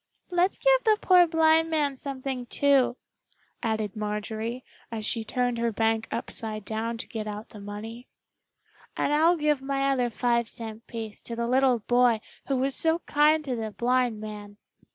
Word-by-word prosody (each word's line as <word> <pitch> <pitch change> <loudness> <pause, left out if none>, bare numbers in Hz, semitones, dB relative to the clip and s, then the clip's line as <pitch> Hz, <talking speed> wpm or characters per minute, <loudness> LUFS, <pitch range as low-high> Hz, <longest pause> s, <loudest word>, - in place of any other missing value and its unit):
"Let's 355 +2 +2
give - - +4
the 435 -2 +4
poor 360 -5 +6
blind 325 0 +4
man 295 -3 +1
something, 260 -2 -5
too," 275 -3 +3 0.6
added 220 -2 -2
Marjorie, 215 +3 -4 0.3
as 220 -2 -4
she 225 0 0
turned 245 +1 -1
her 235 0 +1
bank 225 +1 0
upside 215 -2 -4
down 225 +1 -3
to 230 - -6
get 220 -2 -5
out 210 +1 -6
the 210 - -11
money. 215 +4 -8 0.9
"And 290 - +1
I'll 330 +4 +4
give 300 -3 +1
my 275 0 0
other 250 -3 +1
five 235 0 0
cent 225 0 -7
piece 225 -2 -7
to 235 - -6
the 235 0 -1
little 255 -1 +3
boy 245 0 +3 0.3
who 275 - +1
was 265 +1 0
so 325 0 +2
kind 300 +1 +3
to 260 -3 -2
the 220 -2 -3
blind 245 0 0
man!" 210 -1 -8
245 Hz, 170 wpm, -27 LUFS, 220-280 Hz, 0.9 s, poor